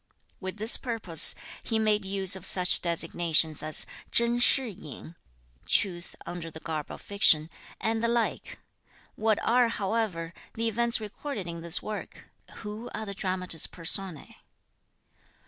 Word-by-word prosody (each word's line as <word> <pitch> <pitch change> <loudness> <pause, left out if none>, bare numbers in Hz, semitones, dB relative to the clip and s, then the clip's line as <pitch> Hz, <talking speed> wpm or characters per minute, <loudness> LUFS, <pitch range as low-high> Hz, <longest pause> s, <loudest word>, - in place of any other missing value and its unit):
With 190 +1 -6
this 220 +3 +4
purpose, 225 - +2 0.3
he 225 - -1
made 215 -1 +2
use 190 -1 +4
of 190 - -9
such 180 -1 +3
designations 165 -2 +2
as 155 0 0 0.2
Chen 235 0 +2
Shih 260 +1 +5
yin 165 - -10 0.5
(truth 175 -4 +1
under 170 -2 -6
the 160 - -11
garb 155 -2 -5
of - - -9
fiction) 165 -6 +3 0.3
and 225 0 -1
the - - +2
like. 235 -1 -2 0.6
What 220 -1 +1
are, 245 +1 +3
however, 195 -6 -2 0.2
the 230 0 -1
events 235 +2 +2
recorded 215 0 -6
in 170 -1 -7
this 170 0 +3
work? 215 -1 -8 0.3
Who 210 +3 -7
are 220 - -5
the 200 - -5
dramatis 185 -4 -2
personae? 175 -1 -2
195 Hz, 140 wpm, -27 LUFS, 170-225 Hz, 0.6 s, Shih